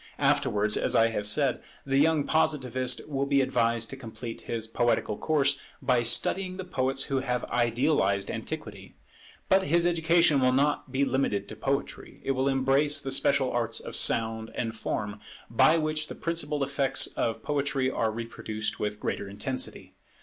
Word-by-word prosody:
Afterwards, 105 +1 +2
as - - +1
I 115 0 +5
have 105 -2 -3
said, 135 +4 +1 0.2
the 135 0 +2
young 155 0 +3
Positivist 130 -5 0
will 140 -2 -2
be 140 0 +3
advised 115 -3 +1
to - - -5
complete 115 -2 -8
his 115 -2 -2
poetical 115 -1 0
course, 140 +1 +1 0.2
by 125 -2 +2
studying 185 +10 0
the 190 - -4
poets 135 -6 -1
who 135 -1 -1
have 125 -2 -2
idealized 120 -5 +1
antiquity. - - -7 0.5
But 190 +1 +4
his 170 +3 +3
education 165 -3 +3
will 130 -1 +3
not 140 0 +1
be 135 +2 +1
limited 130 -7 -1
to - - -7
poetry, 140 +1 -3
it - - +1
will 135 0 0
embrace 135 +2 +2
the 135 - -4
special 135 0 +3
arts 120 -1 0
of - - -8
sound 110 0 +1
and 115 -2 -3
form, 105 -1 -4 0.3
by 155 +8 +5
which 155 -1 -1
the - - -8
principal 150 -4 -2
effects 140 -1 +2
of 115 - -3
poetry 140 -2 0
are 110 - 0
reproduced 110 -1 -4
with 105 0 -3
greater 100 - -3
intensity. 105 +6 -4
130 Hz, 165 wpm, -27 LUFS, 115-145 Hz, 0.5 s, I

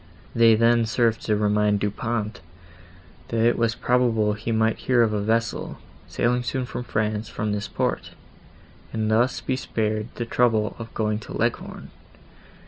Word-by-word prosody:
They 115 -1 +6
then 115 0 +3
served 115 -1 +1
to 105 - +3
remind 105 0 +2
Du 105 0 0
Pont, 110 0 -3 0.9
that 115 -1 +1
it 120 - +4
was 115 -1 +1
probable 120 -4 +2
he 110 +2 -4
might 110 0 +1
hear 125 -2 +3
of 110 -2 +1
a 105 - 0
vessel, 115 +2 -1 0.3
sailing 125 +1 0
soon 130 +1 -2
to 125 - -5
France 110 -2 -2
from 105 0 -3
this 105 0 -2
port, - - -2 0.8
and 110 -1 -1
thus 120 +4 +2
be 130 - -1
spared 110 -4 -2
the 120 - -3
trouble 115 -3 +1
of 115 0 -7
going 105 -1 0
to 110 - -7
Leghorn. - - -3
110 Hz, 160 wpm, -24 LUFS, 105-120 Hz, 0.9 s, They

